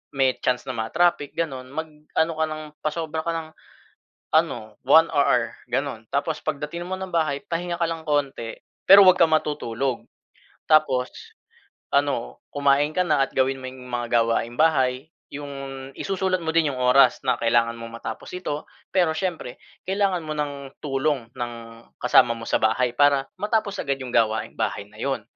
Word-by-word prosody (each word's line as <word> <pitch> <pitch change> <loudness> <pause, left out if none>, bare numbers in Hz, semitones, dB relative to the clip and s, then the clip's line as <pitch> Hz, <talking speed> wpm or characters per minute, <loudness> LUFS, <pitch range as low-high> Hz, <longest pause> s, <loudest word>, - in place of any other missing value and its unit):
may 130 -1 +2
chance 125 -1 0
na - - -2
ma-traffic 145 +6 +1
ganun. 135 -6 -3
Mag-ano 160 +1 -2
ka 160 - +2
ng, 155 0 -5 0.2
pasobra 160 0 -2
ka - - +2
ng 160 -1 -5 0.9
ano 110 -1 +1
1 160 +5 +6
hour 125 -5 +2
ganun. 130 -3 -2
Tapos 150 +3 0
pagdating 155 +3 -3
mo 190 - -3
ng 190 - -4
bahay 155 -4 +1
pahinga 170 0 -3
ka 170 - +2
lang 165 -1 -5
konti, 140 -6 -1 0.3
pero 195 +1 +11
huwag 185 0 +7
kang 165 -2 +5
matutulog. 135 -5 -1 0.7
Tapos 135 -5 +4 0.9
ano - - 0
kumain 140 +1 +3
ka 185 - +4
na 150 -4 +3
at - - -9
gawin 135 0 +1
mo - - -5
yung 130 -1 -12
mga 120 -1 -2 0.2
gawaing 115 +1 -1
bahay. 135 -4 +2 0.3
Yung 135 -2 -7
isusulat 190 -2 -1
mo 160 - -1
din 160 -2 +2
yung 130 - -6
oras 125 +2 +5
na 125 -2 +2
kailangan 115 0 +2
mong 115 0 -8
matapos - - -6
ito. 155 -5 -4 0.3
Pero, 175 -4 +3
siyempre 165 -7 -4 0.3
kailangan 190 -2 +1
mo 155 - -3
ng 140 -2 -4
tulong 135 -4 -1
ng 120 -1 -4 0.5
kasama 125 -1 +5
mo 115 - -9
sa - - +2
bahay. 115 +3 +2
Para 140 0 +4
matapos 210 -1 -1
agad 140 -1 -1
yung 130 - -6
gawaing 110 -2 +1
bahay 105 -2 -1
na 105 - -17
yun. 135 +1 -1
140 Hz, 165 wpm, -24 LUFS, 125-160 Hz, 0.9 s, pero